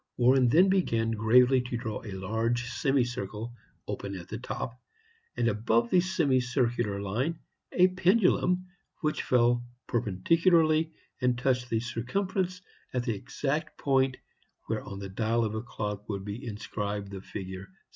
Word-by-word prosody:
Warren 125 0 +5
then 175 +9 +6
began 115 -13 +2
gravely 125 +4 +5
to 125 -1 -4
draw 110 -3 -4
a 105 -4 -7
large 110 +5 -1
semicircle, 120 -4 -1 0.3
open 100 0 -4
at 90 -2 -9
the - - -5
top, 125 +1 -5 0.6
and 120 - +2
above 115 +2 +1
the 180 - +5
semicircular 125 - +1
line 120 - -1 0.3
a 180 0 +5
pendulum, 185 -1 +2 0.4
which 155 -2 0
fell 120 -1 +3 0.2
perpendicularly 160 - +3 0.3
and 125 -1 +2
touched 125 -1 0
the 115 - +1
circumference 180 - -2 0.3
at 125 - +1
the 120 -2 0
exact 140 +8 -3
point 135 -2 +2 0.5
where - - -2
on 100 - -7
the 100 -1 -6
dial 115 +3 +1
of 110 - -2
a 110 - -2
clock 105 -3 -5
would 100 -2 -3
be 110 +6 -6
inscribed 105 -2 -4
the 95 -1 -6
figure 95 -1 -7
VI. - - -27
120 Hz, 145 wpm, -29 LUFS, 110-140 Hz, 0.6 s, then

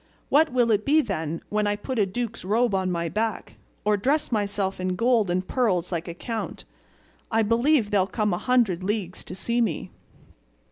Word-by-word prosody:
What 310 +1 +4
will 245 -2 +3
it 210 -1 +2
be, 295 +5 +4
then, 165 - -3
when 210 0 +1
I 205 - +1
put 235 +4 -4
a 200 - +3
duke's 230 +3 -4
robe 220 +4 +1
on 190 -1 0
my 170 -1 -1
back, 220 +5 -3 0.3
or 210 0 +3
dress 280 +9 +1
myself 200 -3 -1
in 185 0 -1
gold 230 -1 +2
and 185 +1 -1
pearls 190 -9 0
like 170 0 -3
a 170 - -6
count? 225 +4 -5 0.7
I 225 0 +3
believe 230 +1 +2
they'll 195 -2 +3
come 210 -1 0
a 175 - -1
hundred 230 -9 +2
leagues 195 -2 -2
to 180 - -8
see 235 +4 0
me." 205 -9 -2
210 Hz, 190 wpm, -25 LUFS, 185-235 Hz, 0.7 s, What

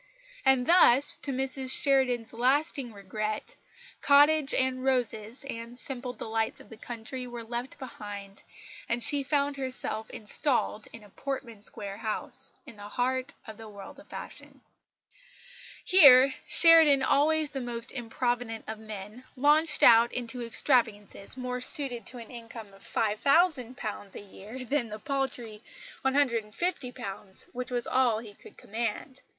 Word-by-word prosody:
And 265 -2 +3
thus, 285 -5 +5
to 280 - -4
Mrs 265 0 -1
Sheridan's 255 -5 +1
lasting 265 +1 0
regret, 215 +1 -5 0.5
cottage 290 0 +5
and 260 0 0
roses 245 -2 -1
and 235 -1 -8
simple 250 -1 -5
delights 225 -2 -3
of - - -16
the 225 - -10
country 240 +3 -6
were 240 -1 -8
left 240 +3 -6
behind, 205 -6 -9 0.5
and 235 0 0
she 285 -1 +2
found 280 0 -1
herself 255 -4 -4
installed 220 -1 0
in 230 - -12
a 205 - -16
Portman 260 -5 -6
Square 200 -1 -5
house, 215 -1 0
in 250 -7 -13
the 205 0 -9
heart 255 +4 -2
of 220 -2 -10
the 225 -1 -10
world 200 -2 -12
of - - -16
fashion. - - -10 1.2
Here 275 -7 +7
Sheridan, 320 -5 +6
always 305 +2 +2
the 270 - -4
most 235 -1 -3
improvident 240 -1 -3
of 220 0 -6
men, 215 +2 -9
launched 300 +4 +3
out 235 0 +7
into 245 0 -3
extravagances 225 -3 0
more 250 0 -4
suited 250 -4 -1
to 250 - -5
an 230 -2 -11
income 230 -3 -10
of 195 0 -16
£5000 245 - 0
a - - -6
year 210 +5 -9
than 255 -3 -1
the 215 - -6
paltry 245 -4 -4 0.4
£150 250 - 0
which 250 +1 -5
was 245 -1 +1
all 255 -4 +2
he 220 -2 -8
could - - -16
command. 230 +4 -5
245 Hz, 140 wpm, -28 LUFS, 220-270 Hz, 1.2 s, Here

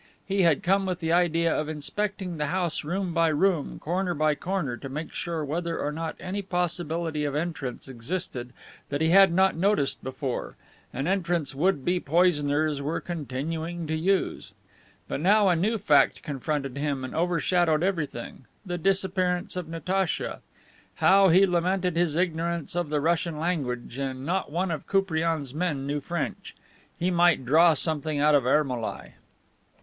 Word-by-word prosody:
He 195 0 0
had 165 -5 +3
come 195 +2 +2
with 180 -2 -1
the 165 -1 0
idea 170 -1 +2
of 155 0 -2
inspecting 185 +4 -3
the 150 -1 -1
house 175 0 0
room 180 +3 -2
by 165 0 +3
room, 160 0 +1
corner 180 +2 -2
by 155 0 +2
corner, 160 -4 -2
to 135 - -8
make 150 +4 -6
sure 165 -3 -3
whether 165 +3 -2
or 145 - -2
not 160 +1 -4
any 190 +2 -3
possibility 170 -4 -2
of 145 -1 -2
entrance 150 -6 -4
existed 130 0 -4 0.4
that 145 - -2
he 160 +1 +2
had 195 +1 +7
not 190 +2 +3
noticed 175 -5 +1
before, 130 0 -4 0.4
an 135 +2 -3
entrance 175 -5 0
would 145 -1 +1
be 180 0 +2
poisoners 150 -3 +2
were 150 +4 -2
continuing 165 +2 -4
to 160 0 -2
use. 185 +4 0 0.5
But - - -3
now 200 +4 +4
a 175 - +4
new 210 +7 +1
fact 155 -8 +3
confronted 140 -1 -3
him 140 -2 -2
and 130 - -6
overshadowed 170 -1 +1
everything: 150 -9 -3 0.2
the 175 -1 -3
disappearance 185 0 0
of 180 -3 -4
Natacha. 180 +2 -2 0.5
How 195 0 +5
he 185 +4 +6
lamented 180 0 0
his 170 -3 +1
ignorance 170 -2 -1
of 175 -3 -1
the 150 -1 0
Russian 165 0 0
language 135 -7 -3
and 135 -1 -4
not 180 -1 -1
one 175 +3 -1
of 160 - -5
Koupriane's 165 -7 0
men 150 -4 -2
knew 145 +1 -1
French. 170 +2 -4 0.4
He 180 +2 0
might 175 -6 +3
draw 160 +5 +5
something 155 0 0
out 150 +1 +4
of 140 -4 +3
Ermolai. 130 -5 0
165 Hz, 160 wpm, -26 LUFS, 150-180 Hz, 0.5 s, had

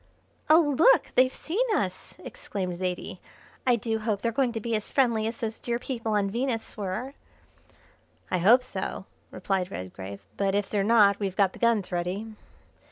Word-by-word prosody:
"Oh, 310 -2 +5
look, - - +5
they've 255 0 +4
seen 375 - -1
us!" - - -3
exclaimed 185 -3 -5
Zaidie. 180 0 -4 0.5
"I 245 - +5
do 225 0 -2
hope 215 -2 -2
they're 230 - +1
going 250 +1 +1
to 225 - -3
be 230 +1 -2
as 215 - -3
friendly 235 -5 +2
as 225 +1 -4
those 225 -1 -4
dear 235 -1 -2
people 235 -3 -3
on 205 -1 +2
Venus 235 0 -2
were." 215 +6 -4 1.2
"I 185 - +1
hope 235 +8 +6
so," 190 -5 -5 0.2
replied 185 0 -2
Redgrave, 95 - -8
"but 195 0 +1
if 205 -1 0
they're 205 -2 +1
not 205 -2 +5
we've 195 -3 -2
got 195 -2 +3
the - - -12
guns 230 -5 +2
ready." 180 +4 -2
215 Hz, 170 wpm, -27 LUFS, 190-235 Hz, 1.2 s, hope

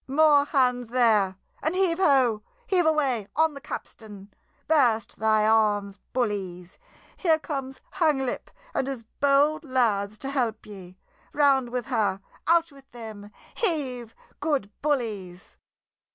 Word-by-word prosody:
"More 290 +1 +4
hands 250 -4 +1
there! 220 -6 +2 0.2
And 315 +4 -1
heave, 370 -2 +1
ho, 260 - +3 0.2
heave 365 -7 +2
away 270 -9 +1
on 320 -1 +3
the 280 - -10
capstan! 205 -6 -9 0.3
Burst 245 -9 +2
thy 215 0 +3
arms, 205 -2 +2
bullies! 195 -7 -3 0.4
Here 325 -4 +3
comes 270 -4 -5
Hanglip 300 -8 0 0.2
and 265 - -1
his 265 -4 -5 0.2
bold 285 +3 +3
lads 220 -7 0
to 270 +5 -5
help 235 -6 -1
ye! 185 -3 -11 0.4
Round 275 -4 +3
with 245 -1 -3
her! 215 -6 0 0.3
Out 335 0 +3
with 275 -1 -18
them! 220 -4 -10 0.2
Heave, 260 - -2 0.2
good 285 -9 -1
bullies!" 215 -11 -3
250 Hz, 125 wpm, -26 LUFS, 215-290 Hz, 0.4 s, More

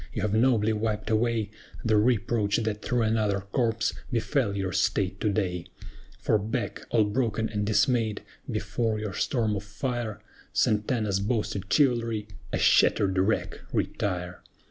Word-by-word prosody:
you 110 - -2
have 105 -1 0
nobly 110 -2 +3
wiped 110 0 -2
away 110 -1 +1 0.3
The 110 -1 +3
reproach 105 -1 +2
that 110 -2 -2
through 120 -2 0
another 110 -3 +1
corps 115 -2 +1 0.2
befell 115 -3 0
your 95 -1 -1
State 95 +1 0
to 105 - +1
day; 90 -4 -1 0.5
For 110 - +2
back, 110 +4 -3
all 115 -2 +4
broken 110 +1 0
and 105 -1 -2
dismayed, 110 -1 +2 0.3
before 115 -2 -1
your 105 -3 -4
storm 110 0 0
of 100 - -4
fire, 115 +1 -3 0.3
SANTANA'S 105 -2 +1
boasted 105 -2 -2
chivalry, 115 -6 +2 0.2
a - - 0
shattered 95 -2 +4
wreck, 100 +4 0
retire. 90 -3 -2
110 Hz, 140 wpm, -27 LUFS, 100-115 Hz, 0.5 s, all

